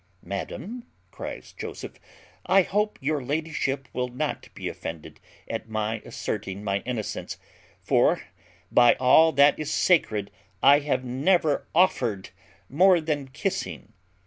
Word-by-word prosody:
"Madam," 205 Hz, -, -6 dB, 0.3 s
cries -, -, -8 dB
Joseph, -, -, -8 dB, 0.5 s
"I 195 Hz, 0 st, +5 dB
hope 210 Hz, +3 st, -1 dB
your 145 Hz, -1 st, 0 dB
ladyship 140 Hz, -2 st, -2 dB
will 125 Hz, 0 st, -1 dB
not 125 Hz, 0 st, -4 dB
be -, -, -5 dB
offended 80 Hz, -2 st, -7 dB, 0.3 s
at -, -, -5 dB
my 110 Hz, +1 st, -2 dB
asserting 100 Hz, -1 st, -5 dB
my 100 Hz, -1 st, 0 dB
innocence; 120 Hz, -4 st, -4 dB, 0.5 s
for, -, -, +3 dB, 0.5 s
by 120 Hz, 0 st, +6 dB
all 160 Hz, +6 st, +5 dB
that 140 Hz, +1 st, +5 dB
is 155 Hz, -, -3 dB
sacred, 110 Hz, -, +2 dB, 0.3 s
I 140 Hz, +1 st, +7 dB
have 140 Hz, -3 st, -1 dB
never 145 Hz, +5 st, +1 dB
offered 120 Hz, -, +2 dB, 0.4 s
more 180 Hz, +6 st, +5 dB
than 150 Hz, -4 st, -2 dB
kissing." 185 Hz, -, -4 dB
140 Hz, 120 wpm, -26 LUFS, 110-160 Hz, 0.5 s, I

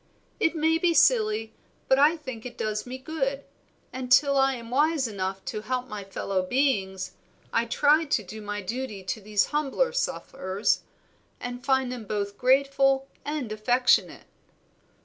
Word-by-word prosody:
It 325 Hz, -, +2 dB
may 320 Hz, +1 st, +2 dB
be 340 Hz, -1 st, +2 dB
silly, 220 Hz, -4 st, +3 dB, 0.3 s
but 265 Hz, -, +4 dB
I 305 Hz, +4 st, +5 dB
think 260 Hz, -7 st, -8 dB
it 250 Hz, -, -8 dB
does 215 Hz, +1 st, -2 dB
me 255 Hz, +1 st, -5 dB
good; 275 Hz, -1 st, -3 dB, 0.5 s
and 255 Hz, -1 st, -5 dB
till 280 Hz, +1 st, +5 dB
I 270 Hz, 0 st, +3 dB
am 235 Hz, -1 st, -9 dB
wise 295 Hz, 0 st, +2 dB
enough 195 Hz, -2 st, -4 dB
to 210 Hz, -, -4 dB
help 255 Hz, +3 st, -3 dB
my 210 Hz, -1 st, -6 dB
fellow 195 Hz, 0 st, -2 dB
beings, 190 Hz, -4 st, 0 dB, 0.4 s
I 230 Hz, -, +2 dB
try 295 Hz, +6 st, +3 dB
to 245 Hz, -7 st, 0 dB
do 215 Hz, +4 st, -9 dB
my 205 Hz, -1 st, -4 dB
duty 220 Hz, -1 st, -4 dB
to 185 Hz, +4 st, -4 dB
these 210 Hz, 0 st, +1 dB
humbler 300 Hz, -, +1 dB
sufferers, 200 Hz, -, -1 dB, 0.6 s
and 245 Hz, 0 st, -6 dB
find 265 Hz, -2 st, +1 dB
them 245 Hz, -3 st, -6 dB
both 200 Hz, -1 st, -3 dB
grateful 270 Hz, +1 st, +3 dB
and 290 Hz, -6 st, -3 dB
affectionate." 245 Hz, +4 st, +2 dB
250 Hz, 155 wpm, -26 LUFS, 210-275 Hz, 0.6 s, I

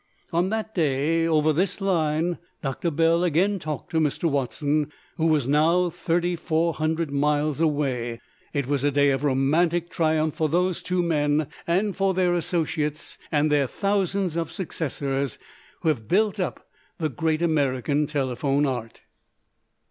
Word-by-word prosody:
On 175 Hz, +3 st, +2 dB
that 220 Hz, 0 st, -3 dB
day 160 Hz, +1 st, +1 dB
over 155 Hz, -1 st, +3 dB
this 180 Hz, +5 st, 0 dB
line 170 Hz, -3 st, 0 dB, 0.2 s
Doctor 135 Hz, +5 st, -1 dB
Bell 165 Hz, +2 st, +2 dB
again 180 Hz, +4 st, +2 dB
talked 155 Hz, -2 st, -5 dB
to 160 Hz, -, +2 dB
Mr. 150 Hz, 0 st, -1 dB
Watson, 145 Hz, +1 st, 0 dB, 0.3 s
who 165 Hz, -1 st, +2 dB
was 150 Hz, -5 st, +2 dB
now 165 Hz, +5 st, +3 dB
3,400 165 Hz, -2 st, 0 dB
miles 150 Hz, +1 st, +1 dB
away. 130 Hz, -7 st, 0 dB, 0.3 s
It 140 Hz, -2 st, -1 dB
was 140 Hz, 0 st, -1 dB
a 145 Hz, -, +3 dB
day 145 Hz, 0 st, +3 dB
of 135 Hz, +1 st, -1 dB
romantic 160 Hz, +5 st, +1 dB
triumph 155 Hz, -1 st, +1 dB
for 155 Hz, -1 st, 0 dB
these 180 Hz, +2 st, +1 dB
two 180 Hz, -1 st, 0 dB
men 150 Hz, -3 st, +1 dB, 0.2 s
and 190 Hz, +4 st, +1 dB
for 195 Hz, -1 st, +1 dB
their 180 Hz, -1 st, +2 dB
associates 160 Hz, -3 st, -2 dB
and 150 Hz, 0 st, +2 dB
their 145 Hz, -2 st, +3 dB
thousands 195 Hz, -1 st, 0 dB
of 165 Hz, -1 st, -2 dB
successors 140 Hz, -, -3 dB, 0.4 s
who 160 Hz, -, +2 dB
have 115 Hz, -9 st, -1 dB
built 210 Hz, +2 st, +2 dB
up 180 Hz, -, -3 dB, 0.3 s
the 155 Hz, -2 st, -1 dB
great 155 Hz, +5 st, -1 dB
American 145 Hz, -2 st, +1 dB
telephone 140 Hz, 0 st, 0 dB
art. 120 Hz, -5 st, -4 dB
155 Hz, 145 wpm, -25 LUFS, 145-175 Hz, 0.4 s, over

